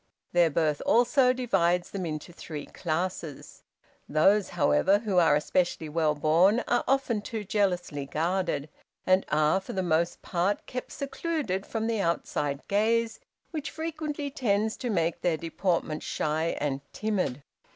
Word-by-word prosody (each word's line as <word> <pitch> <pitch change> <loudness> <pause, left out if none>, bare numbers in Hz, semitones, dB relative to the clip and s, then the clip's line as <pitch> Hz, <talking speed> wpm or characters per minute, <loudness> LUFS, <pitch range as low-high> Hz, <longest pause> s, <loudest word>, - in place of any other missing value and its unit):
Their 175 -1 +4
birth, 155 -1 0
also, 250 +2 +4
divides 180 -9 +1
them 185 -3 -3
into 155 +2 -6
three 155 -3 -7
classes. 165 -3 -4 0.5
Those, 195 +7 +4
however, 180 +6 +4
who 205 -4 +1
are 165 -4 +5
especially 160 +1 0
well 155 -1 +1
born, 170 +10 +4
are 245 - +2
often 265 -5 +1
too 220 0 -5
jealously 180 -8 -1
guarded, 170 -1 -1 0.4
and 185 +1 +4
are, 155 +4 +3
for 190 - -8
the 190 - -1
most 170 0 0
part, 185 +3 0
kept 250 0 -6
secluded 280 - -3
from 225 -1 -2
the 225 -2 0
outside 145 -4 -1
gaze, 225 +3 +1 0.3
which 310 -4 -4
frequently 310 -3 -4
tends 220 -4 0
to 245 - -3
make 170 -5 0
their 170 -3 +1
deportment 165 -1 -1
shy 155 +2 -1
and 140 -2 -1
timid. 185 -11 -1
185 Hz, 140 wpm, -28 LUFS, 160-220 Hz, 0.5 s, are